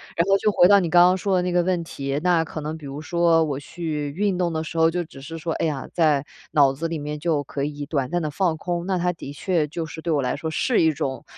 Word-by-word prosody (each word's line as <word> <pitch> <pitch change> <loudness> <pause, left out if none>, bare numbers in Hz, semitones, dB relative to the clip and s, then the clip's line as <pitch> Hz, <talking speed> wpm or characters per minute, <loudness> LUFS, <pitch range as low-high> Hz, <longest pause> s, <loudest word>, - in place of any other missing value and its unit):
然 170 - +2
后 195 - +5
就 210 - +2
回 175 - +6
到 200 +1 +7
你 175 -3 -1
刚 175 +1 +7
刚 180 +1 +4
说 195 +1 0
的 180 - +2
那 180 - -1
个 175 0 +3
问 180 -1 0
题， 140 -3 -3
那 175 -2 +3
可 160 - -7
能 155 +1 -4
比 155 - -11
如 140 +2 -6
说 170 0 +3
我 145 -3 -2
去 150 -1 -4
运 195 +5 0
动 175 -1 0
的 160 -1 -2
时 160 +1 -7
候， 160 0 +5
就 175 +1 -2
只 145 -4 -13
是 165 +4 -7
说， 165 0 -3
哎 - - -1
呀， 140 -4 -4
在 150 -5 +2 0.3
脑 140 -3 +5
子 160 +5 -3
里 165 0 -3
面 150 0 -5
就 155 -2 0
可 140 0 -4
以 145 0 -4
短 140 -3 -2
暂 175 - 0
地 155 -2 -3
放 170 -1 0
空。 175 +1 -3
那 190 -1 +1
它 180 0 0
的 140 -4 -8
确 165 0 0
就 165 +2 -4
是 160 +1 -8
对 165 - -2
我 145 -3 +2
来 125 - -1
说 160 +2 -4
是 230 +8 +1
一 160 - +4
种 135 -2 -4
160 Hz, 310 characters per minute, -23 LUFS, 145-175 Hz, 0.3 s, 到